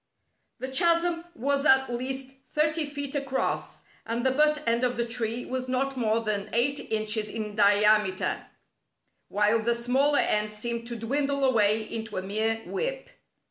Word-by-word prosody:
The 260 - -5
chasm 335 +4 +2
was 280 +3 0
at 265 -3 +5
least 265 +2 -4 0.2
thirty 305 0 +1
feet 285 -1 -4
across, 275 -2 -2 0.2
and 235 +2 -3
the 260 - +4
butt 300 +1 +2
end 235 +1 +2
of 245 -1 0
the 235 - 0
tree 230 0 -1
was 255 0 -4
not 270 +2 -1
more 230 -2 +1
than 210 -3 -2
eight 270 +5 +2
inches 215 0 0
in 215 -2 -5
diameter, 205 -1 +3 0.8
while 210 +2 +2
the 235 +2 +1
smaller 265 +5 +2
end 210 0 +1
seemed 235 +2 -4
to 240 - -5
dwindle 280 +5 -1
away 220 -4 +3
into 220 -1 -6
a 185 - -2
mere 220 +3 -1
whip. - - -3
240 Hz, 155 wpm, -27 LUFS, 220-275 Hz, 0.8 s, at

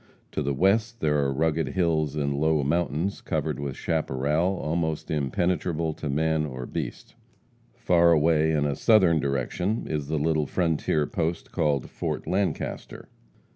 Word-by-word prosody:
To - - -2
the 70 -1 -1
west 110 - +2
there 75 -4 +1
are 70 -1 +1
rugged 80 +3 0
hills 80 -5 0
and 70 -2 0
low 75 0 +2
mountains, 85 +4 -1
covered - - -2
with 70 -2 -4
chaparral 80 +4 0
almost 80 -1 -2
impenetrable 80 +2 0
to 75 - -5
man 80 +2 +1
or 65 -4 -5
beast. - - -6 0.6
Far 85 -1 +4
away 80 0 +3
in 75 -2 +1
a 70 -1 0
southern 95 -8 +4
direction 70 - -1
is 75 -3 -3
the 80 +1 -1
little 75 0 +1
frontier 80 -3 0
post 85 +2 -3
called 75 -6 0
Fort - - -4
Lancaster. 95 +1 -3
80 Hz, 145 wpm, -26 LUFS, 75-85 Hz, 0.6 s, Far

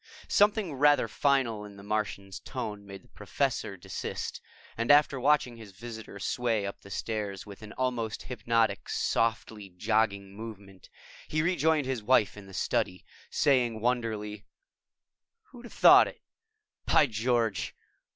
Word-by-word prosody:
Something 205 -4 +3
rather 145 -2 +4
final 125 -4 +1
in 100 -1 -11
the 100 - -12
Martian's 100 -2 -3
tone 105 -1 -6
made 95 -1 -10
the - - -22
Professor 105 -2 -2
desist, 85 - -5 0.3
and 115 +1 -2
after 145 -2 +5
watching 135 -3 +2
his 110 -4 -12
visitor 110 0 -9
sway 115 0 -1
up 100 - -6
the 100 - -14
stairs 105 -2 -4
with 100 0 -11
an 105 0 -10
almost 125 -4 -2
hypnotic 115 -4 0
softly 110 -2 -1
jogging 100 0 0
movement, 100 -3 -10 0.4
he 155 0 0
rejoined 160 -4 +2
his 130 -3 -2
wife 110 -2 +3
in 105 -1 -11
the 95 - -13
study, 90 -1 -1 0.2
saying 125 -6 +2
wonderingly, 110 -3 -2 1.1
"Who'd 245 -1 -12
have 240 - -11
thought - - +8
it, - - -10 0.7
by - - +5
George! 115 -3 0
110 Hz, 140 wpm, -29 LUFS, 100-130 Hz, 1.1 s, thought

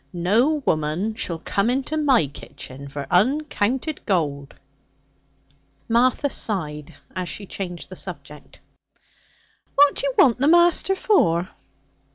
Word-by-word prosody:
No 230 - +1
woman 155 +8 0
shall 180 -6 -4
come 200 +6 -1
into 270 +4 -1
my 280 - +3
kitchen 140 0 -10
for 140 0 -6
uncounted 265 - 0
gold.' 145 -8 -1 1.3
Martha 245 +4 +2
sighed 150 - -3 0.2
as 185 -1 -3
she 205 - -6
changed 180 -2 -7
the 185 - -9
subject. 150 -5 -9 1.1
'What 290 0 +6
do - - -5
you 270 - -3
want 250 -3 +5
the 275 - +2
master 345 +3 +4
for?' 180 - +2
200 Hz, 120 wpm, -22 LUFS, 165-270 Hz, 1.3 s, What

